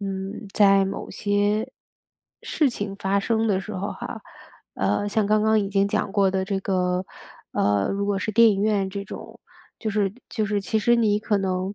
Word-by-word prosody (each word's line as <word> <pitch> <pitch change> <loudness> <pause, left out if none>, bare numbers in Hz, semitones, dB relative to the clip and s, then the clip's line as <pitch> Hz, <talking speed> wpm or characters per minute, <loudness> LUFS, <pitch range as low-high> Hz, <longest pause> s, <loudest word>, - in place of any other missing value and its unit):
嗯， 195 +1 -5
在 195 -2 +5
某 195 - -5
些 205 +1 0 0.7
事 295 -4 +1
情 205 -4 -5
发 200 0 0
生 225 +2 0
的 195 -3 +1
时 210 +2 -7
候 195 +2 -3
哈， - - -7 0.5
呃， 205 - 0
像 205 0 +1
刚 215 +1 +3
刚 220 0 +3
已 200 - -2
经 200 0 +2
讲 200 - -1
过 195 -2 +3
的 190 0 0
这 195 -1 -1
个， 180 -1 0 0.5
呃， 100 -1 +1
如 200 0 -1
果 200 -1 0
是 215 - -3
电 230 +2 +7
影 200 -1 +1
院 205 -3 +1
这 200 +1 -5
种， - - -10 0.4
就 220 - -3
是 200 -2 +1 0.2
就 215 -2 -1
是 205 -1 -1
其 220 +2 0
实 240 +3 +3
你 210 -3 +2
可 210 -1 0
能， 190 0 -2
200 Hz, 210 characters per minute, -24 LUFS, 195-215 Hz, 0.7 s, 电